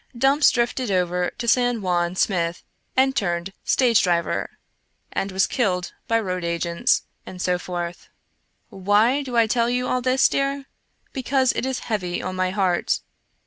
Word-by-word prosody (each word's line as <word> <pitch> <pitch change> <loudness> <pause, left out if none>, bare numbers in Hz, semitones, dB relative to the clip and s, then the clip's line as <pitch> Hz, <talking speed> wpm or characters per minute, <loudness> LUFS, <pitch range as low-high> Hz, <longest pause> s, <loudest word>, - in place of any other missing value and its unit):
Dumps 275 +4 +4
drifted 240 0 -1
over 180 -1 0
to 235 - -4
San 245 -1 +2
Juan 175 -1 0
Smith 175 -3 0 0.3
and 265 0 +3
turned 175 -3 -1
stage 235 -4 +3
driver, 170 -2 0 0.6
and 195 - -2
was 190 +1 +2
killed 180 -7 -1
by 230 0 +2
road 185 -4 -3
agents, 170 0 0 0.2
and 185 - -10
so 180 0 0
forth. 175 -1 -6 0.6
Why 210 +8 +2
do 255 -4 -4
I 230 - +6
tell 235 +1 +1
you 250 +1 0
all 255 - 0
this, 255 +1 +3
dear? 275 0 -1 0.5
Because 265 -1 +1
it 260 - -2
is 265 -1 -3
heavy 185 -6 -2
on 185 - -4
my 185 0 0
heart. 185 -2 0
205 Hz, 155 wpm, -23 LUFS, 180-250 Hz, 0.6 s, I